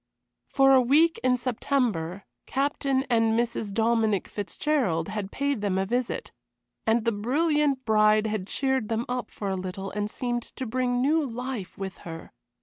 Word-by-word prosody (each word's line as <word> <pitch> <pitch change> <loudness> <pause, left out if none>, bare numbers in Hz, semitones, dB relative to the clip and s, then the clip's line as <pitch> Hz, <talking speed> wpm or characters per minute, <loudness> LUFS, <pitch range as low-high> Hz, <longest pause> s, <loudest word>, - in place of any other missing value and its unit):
For 270 -1 +5
a 260 - +7
week 310 +7 +4
in 255 -1 +3
September 235 - -1 0.2
Captain 275 -1 0
and 225 -2 +2
Mrs. 235 -3 -2
Dominic 220 -2 +1
Fitzgerald 205 - -1
had 205 -1 -4
paid 280 -4 -1
them 200 -2 0
a 190 - +1
visit, 245 +4 -2 0.6
and 225 +1 +2
the 230 - +3
brilliant 280 +4 +1
bride 215 0 +4
had 215 -3 -2
cheered 265 -4 0
them 230 +1 -1
up 250 0 -3
for 200 - -5
a 190 - 0
little 190 +1 -5
and 210 0 -2
seemed 240 +1 -2
to 260 - -7
bring 245 +1 0
new 310 +3 +3
life 250 -5 -5
with 190 -1 -6
her. 165 -1 -9
235 Hz, 160 wpm, -26 LUFS, 205-265 Hz, 0.6 s, a